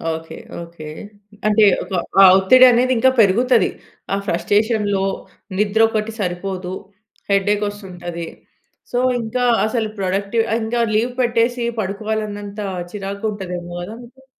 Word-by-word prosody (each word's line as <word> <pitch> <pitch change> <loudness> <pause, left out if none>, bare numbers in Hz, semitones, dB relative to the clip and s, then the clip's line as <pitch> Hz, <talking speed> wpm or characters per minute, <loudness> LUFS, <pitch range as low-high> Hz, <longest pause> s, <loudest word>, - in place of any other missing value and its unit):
Okay. 160 0 -9 0.2
Okay. 170 -2 -10 0.6
అంటే 215 +1 +4 0.2
ఒక - - -14 0.3
ఆహ్, 190 -1 +9
ఒత్తిడి 255 +7 +7
అనేది 255 +2 +3
ఇంకా 260 +3 +5
పెరుగుతది. 225 +2 +4 0.4
ఆ - - +3
ఫ్రస్ట్రేషన్‌లో 205 +2 +1 0.5
నిద్ర 210 +1 +1
ఒకటి 220 0 -2
సరిపోదు, 185 0 -3 0.6
హెడ్‌ఏక్ 205 +1 +2
వస్తుంటది. 175 -4 -7 0.6
సో 245 - -1 0.2
ఇంకా 245 +3 -2 0.2
అసలు 220 0 -1
ప్రొడక్టివ్ 200 +4 0 0.2
ఇంకా 230 +2 -2 0.2
లీవ్ 240 +3 +1
పెట్టేసి 240 0 +1 0.2
పడుకోవాలి 215 +2 -2
అన్నంత 205 0 -7 0.3
చిరాకుగ 200 +1 -4
ఉంటది 190 -3 -6
ఏమో 175 0 -9
కదా! 195 +5 -7
మీకు? 265 +3 -18
205 Hz, 125 wpm, -19 LUFS, 190-225 Hz, 0.6 s, ఆహ్